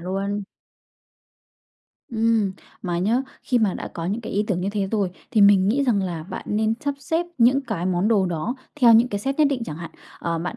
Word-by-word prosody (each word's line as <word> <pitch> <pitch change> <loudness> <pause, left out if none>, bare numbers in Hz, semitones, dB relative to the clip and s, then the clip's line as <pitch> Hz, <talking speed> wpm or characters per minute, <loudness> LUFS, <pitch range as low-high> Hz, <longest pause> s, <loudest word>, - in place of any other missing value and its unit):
luôn. 195 +3 -2 1.7
Ừm, 225 -3 +1 0.3
mà 175 -2 -2
nhá, 225 +8 +1 0.2
khi 250 - +1
mà 215 -5 +1
đã - - -5
có 165 - -6
những 205 +6 -2
cái 230 - -7
ý 205 +1 +1
tưởng 185 -4 -1
như 190 - -1
thế 200 -2 -1
rồi 200 -5 0 0.2
thì 220 - +2
mình 200 -1 +6
nghĩ 275 +6 +2
rằng 220 -7 +2
là 175 -4 -4
bạn 185 +4 -7
nên 220 +1 +1
sắp 285 -2 -1
xếp 325 +5 -1
những 250 +4 +5
cái 215 -9 -3
món 185 +2 +1
đồ 205 -5 +3
đó 175 +7 -2 0.3
theo 235 -2 +8
những 230 +2 +6
cái 205 - -2
set 270 +7 -3
nhất 305 - +6
định 255 -4 -1
chẳng 150 - -6
hạn. 170 +1 -7 0.3
Ờ, 170 -1 -2
bạn 175 +2 -4
205 Hz, 220 wpm, -23 LUFS, 185-235 Hz, 1.7 s, theo